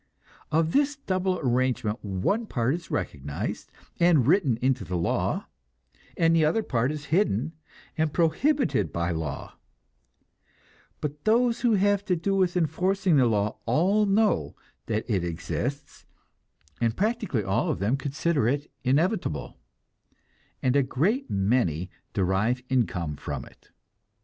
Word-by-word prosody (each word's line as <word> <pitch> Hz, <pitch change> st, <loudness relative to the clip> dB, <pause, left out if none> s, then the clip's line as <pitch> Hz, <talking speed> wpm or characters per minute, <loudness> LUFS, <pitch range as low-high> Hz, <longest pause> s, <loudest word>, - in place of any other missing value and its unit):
Of 160 Hz, +1 st, +2 dB
this 290 Hz, +4 st, +2 dB
double 185 Hz, -8 st, -1 dB
arrangement 125 Hz, -3 st, 0 dB
one 105 Hz, -, -1 dB
part 120 Hz, -, 0 dB
is 170 Hz, -2 st, -6 dB
recognized, 75 Hz, -7 st, -4 dB, 0.3 s
and 170 Hz, -7 st, +4 dB
written 145 Hz, -, +3 dB
into 130 Hz, 0 st, +1 dB
the 90 Hz, -, -3 dB
law; 85 Hz, -, -1 dB, 0.7 s
the 165 Hz, -1 st, +4 dB
other 165 Hz, +9 st, +2 dB
part 125 Hz, -, 0 dB
is 150 Hz, -1 st, -6 dB
hidden, 160 Hz, -, +1 dB, 0.5 s
and 160 Hz, -1 st, +2 dB
prohibited 260 Hz, -, +1 dB
by 85 Hz, +1 st, -1 dB
law; 80 Hz, -4 st, -5 dB, 1.4 s
but 150 Hz, 0 st, -4 dB
those 235 Hz, +2 st, +2 dB
who 235 Hz, -3 st, +3 dB
have 200 Hz, 0 st, +2 dB
to 180 Hz, -, +1 dB
do 195 Hz, +4 st, -1 dB
with 185 Hz, -2 st, +2 dB
enforcing 180 Hz, +2 st, +1 dB
the 130 Hz, -3 st, +5 dB
law 105 Hz, -1 st, 0 dB
all 190 Hz, -, +3 dB
know 210 Hz, +2 st, +2 dB, 0.3 s
that 110 Hz, -1 st, -1 dB
it 100 Hz, -7 st, 0 dB
exists, 120 Hz, -, -4 dB, 0.7 s
and 115 Hz, -1 st, +1 dB
practically 210 Hz, -, 0 dB
all 95 Hz, 0 st, 0 dB
of -, -, 0 dB
them 105 Hz, +7 st, +1 dB
consider 140 Hz, -1 st, 0 dB
it 145 Hz, +4 st, -1 dB
inevitable, 135 Hz, -, 0 dB, 1.0 s
and 130 Hz, +1 st, +2 dB
a 140 Hz, -, +5 dB
great 185 Hz, -, 0 dB
many 95 Hz, -4 st, 0 dB, 0.2 s
derive 100 Hz, +6 st, +1 dB
income 90 Hz, -, 0 dB
from -, -, -5 dB
it. -, -, -20 dB
140 Hz, 130 wpm, -26 LUFS, -, 1.4 s, the